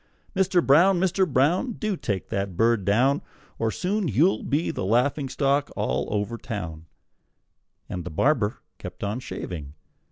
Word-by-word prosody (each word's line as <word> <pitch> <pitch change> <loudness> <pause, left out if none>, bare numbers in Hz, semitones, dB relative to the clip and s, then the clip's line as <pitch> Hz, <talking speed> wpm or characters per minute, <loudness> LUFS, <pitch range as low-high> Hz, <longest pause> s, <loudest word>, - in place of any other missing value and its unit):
Mister 190 -3 +3
Brown! 175 +7 +5
Mister 190 +1 +2
Brown! 175 - +2
Do 215 -1 -2
take 100 - -3
that 100 -3 -3
bird 115 -2 +2
down, 130 +8 +3 0.4
Or 115 - +1 0.2
you'll 195 -1 0 0.3
soon - - -10
be 150 +4 +1
the - - -4
laughing 130 +7 +1
stock 140 +1 +1
all - - -1
over 105 +3 -2
town!" 80 -8 -6 1.0
And 90 -4 -5
the 90 - -6
barber 110 - +1 0.2
kept - - -8
on 105 +4 -2
shaving. 80 - -6
125 Hz, 150 wpm, -25 LUFS, 100-170 Hz, 1.0 s, Brown